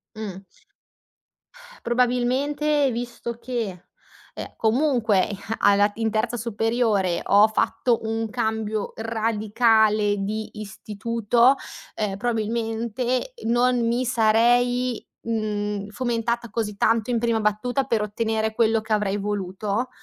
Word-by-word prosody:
Mh. 200 -3 -7 1.4
Probabilmente 265 +4 +1
visto 235 0 -5
che, 230 -8 -4 0.5
ehm, - - -8
comunque 230 -3 +2
i 200 - -5 0.2
alla 205 0 +4
in 225 -1 0
terza 225 +2 -1
superiore 225 -5 0
ho 205 +2 +5
fatto 230 +2 +1
un 225 0 -1
cambio 220 -3 -2
radicale 220 -1 +2
di 215 +2 -3
istituto, 230 +4 +1 0.4
ehm, 200 -3 -2
probabilmente 235 - -2
non 240 +1 +2
mi 240 +2 +1
sarei, 245 +1 +2 0.2
mhmm, 210 -2 -2
fomentata 235 0 -2
così 210 -1 -3
tanto 225 +3 +1
in 235 - +1
prima 230 -1 +1
battuta 220 +5 0
per 230 -5 0
ottenere 220 +1 -1
quello 225 -1 +3
che 220 0 -2
avrei 205 -1 0
voluto. 205 +3 -2
225 Hz, 110 wpm, -24 LUFS, 210-240 Hz, 1.4 s, ho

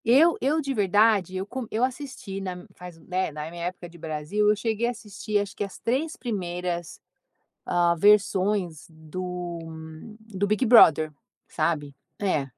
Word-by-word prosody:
Eu 285 +9 +6
eu, 290 +5 +2
de 275 -3 -2
verdade, 205 -3 +3
eu 190 - -3
co 245 +2 -6
eu 225 +3 -1
assisti 255 -7 -4
na 180 -2 -6
faz 180 -2 -11
né, 185 0 -2
na 150 +1 -6
minha 170 0 -5
época 180 0 -5
de 170 0 -15
Brasil, 160 +7 0
eu 210 - +4
cheguei 225 +2 -1
a - - +1
assistir 210 -2 -4
acho 200 -1 -2
que - - -2
as 200 - -7
3 280 +7 -1
primeiras, 175 -6 -4 0.7
hã, 175 -1 +2
versões 195 -3 +2
do 175 +2 -6 0.6
do 205 -3 -3
Big 215 +5 +1
Brother, 160 - +7 0.4
sabe, 155 -3 -1 0.3
é, 185 -8 +1
195 Hz, 155 wpm, -26 LUFS, 175-220 Hz, 0.7 s, Brother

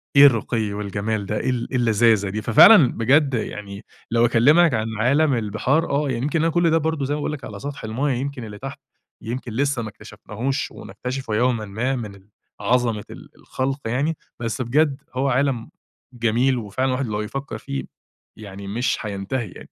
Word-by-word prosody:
إيه 140 - +9
الرُّقي 115 -4 +2
والجَمال 105 +1 -3
ده، 105 +2 -2
إيه 130 - -1
ال 125 -2 -1
إيه 130 - 0
اللذاذة 110 -3 +3
دي! 110 +2 -3
ففعلًا 130 - +7
بجد 135 +4 +3
يعني 100 -2 -5 0.3
لو 115 0 +4
أكلّمك 140 +7 +5
عن 110 -1 0
عالَم 140 +5 +3
البِحَار، 115 +8 0
آه، 140 0 +1
يعني 120 0 -2
يمكن 150 +3 0
أنا 165 - +3
كلّ 175 -1 +3
ده 165 - +4
برضه 160 -3 -1
زي 145 - -1
ما - - -4
باقول 150 - -2
لك 135 -4 -7
على 100 -1 -8
سطح 145 -3 -7
المَيَّة، 125 +5 -1
يمكن 135 -2 -4
اللي 105 -1 -8
تحت 135 +2 -7 0.4
يمكن 120 +1 -5
لسه 140 -1 0
ما 110 - -5
اكتَشفناهوش 110 +5 -5
ونكتشفه 115 +3 -5
يومًا 120 -2 +1
ما 120 +7 -2
من 105 -5 -6
ال 100 +2 -20 0.3
عظَمة 120 -4 +1
ال - - -11
الخلْق 135 +2 -3
يعني. 145 +7 0 0.2
بس 115 +2 -3
بجد 140 +3 +1
هو 135 +1 +1
عالَم 130 -2 0 0.4
جميل 120 +2 +1
وفعلًا 115 +4 -2
الواحد 130 +1 -1
لو 105 -1 -2
يفكّر 135 +6 -5
فيه، 140 0 -5 0.5
يعني 100 -2 -9
مش 120 +6 -1
هينتهي 105 +3 -3
يعني. - - -12
120 Hz, 185 wpm, -22 LUFS, 110-135 Hz, 0.5 s, إيه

